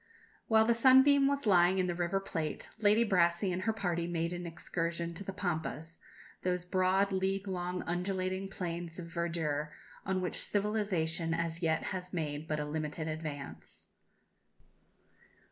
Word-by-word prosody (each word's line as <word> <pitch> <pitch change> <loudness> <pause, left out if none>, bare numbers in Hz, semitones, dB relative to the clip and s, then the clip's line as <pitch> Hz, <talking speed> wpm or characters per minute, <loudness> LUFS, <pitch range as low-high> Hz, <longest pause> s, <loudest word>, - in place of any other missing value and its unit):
While 220 -1 +5
the 235 - +4
Sunbeam 265 +3 +6
was 280 -1 0
lying 180 -2 +5
in 185 - +2
the 175 - -1
River 175 +2 0
Plate, 160 -5 -4
Lady 215 +2 +5
Brassey 180 -1 +2
and 185 - -2
her 225 +4 +1
party 175 -6 -1
made 170 0 -1
an 175 0 -5
excursion 170 +1 -3
to 170 - -7
the 195 - -4
Pampas, 165 -3 -3 0.4
those 180 -1 -1
broad, 185 +2 +2
league 195 +1 0
long 180 -1 -3
undulating 185 +2 -2
plains 170 -3 -4
of 175 - -6
verdure, 165 -3 -2 0.3
on 190 -1 0
which 180 -1 -2
civilization 185 -6 0
as 170 0 -2
yet 160 -1 +1
has 180 0 -5
made 155 -2 -3
but 155 -1 -1
a 150 - -2
limited 155 +1 -3
advance. 155 -3 -6
175 Hz, 150 wpm, -32 LUFS, 165-195 Hz, 0.4 s, Sunbeam